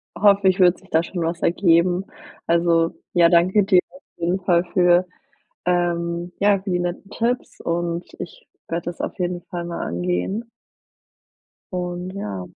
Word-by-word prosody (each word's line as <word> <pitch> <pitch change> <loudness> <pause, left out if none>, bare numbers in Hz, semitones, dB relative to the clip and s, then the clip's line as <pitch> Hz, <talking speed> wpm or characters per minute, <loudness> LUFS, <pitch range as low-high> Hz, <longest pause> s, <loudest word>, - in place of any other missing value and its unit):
hoffe 200 +1 +4
ich, 190 +1 +3
wird 180 -1 +5
sich 190 - -21
da 160 -1 +2
schon 175 0 -5
was 170 +1 -2
ergeben. 175 +1 +3 0.4
Also, 170 -1 +3 0.2
ja 170 -1 +5
danke 180 +4 +4
dir 190 -2 +5
auf 275 - -17
jeden 175 +3 0
Fall 175 -2 +3
für, 180 0 +4 0.6
ähm 175 0 0
ja, 200 -1 +4
für 195 -1 -5
die 180 - +1
netten 175 +3 -4
Tipps 240 +2 -2
und 170 0 -2
ich - - -9 0.2
werde 170 +1 -3
das 175 - -5
auf - - -4
jeden 175 -1 -2
Fall 175 0 -6
mal 170 0 -5
angehen. 90 - -2 1.2
Und, 180 0 -4
ja. 100 - -5
175 Hz, 155 wpm, -22 LUFS, 170-185 Hz, 1.2 s, wird